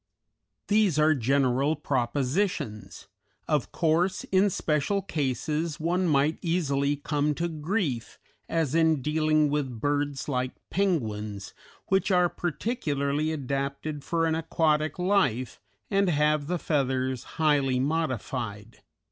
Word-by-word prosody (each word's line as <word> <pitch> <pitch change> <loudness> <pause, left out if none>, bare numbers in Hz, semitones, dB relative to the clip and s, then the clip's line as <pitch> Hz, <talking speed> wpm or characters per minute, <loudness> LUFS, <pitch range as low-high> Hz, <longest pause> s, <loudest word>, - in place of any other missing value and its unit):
These 205 -6 +3
as 155 0 +4
general 135 +3 +2
propositions; 130 - -2 0.4
of 150 -5 0
course, 170 +3 +1
in 195 +2 +4
special 165 +3 0
cases, 150 - -2
one 175 +3 +1
might 150 0 +2
easily 145 -5 +1
come 145 +1 -1
to 170 +3 -1
grief, 155 - -2 0.3
as 160 -4 0
in 160 -4 +3
dealing 155 0 +2
with 135 -6 -2
birds 145 0 -1
like 130 -2 -1 0.2
penguins, 110 - -1 0.4
which 190 +1 +2
are 180 -2 +4
particularly 155 - -1
adapted 140 +1 -3
for 165 -1 0
an 160 - +1
aquatic 155 -2 +1
life, 180 - +1 0.3
and 195 -1 +3
have 150 -2 +2
the 180 +2 0
feathers 130 -5 -1
highly 145 -5 +2
modified. 125 -7 -3
150 Hz, 115 wpm, -27 LUFS, 135-165 Hz, 0.4 s, as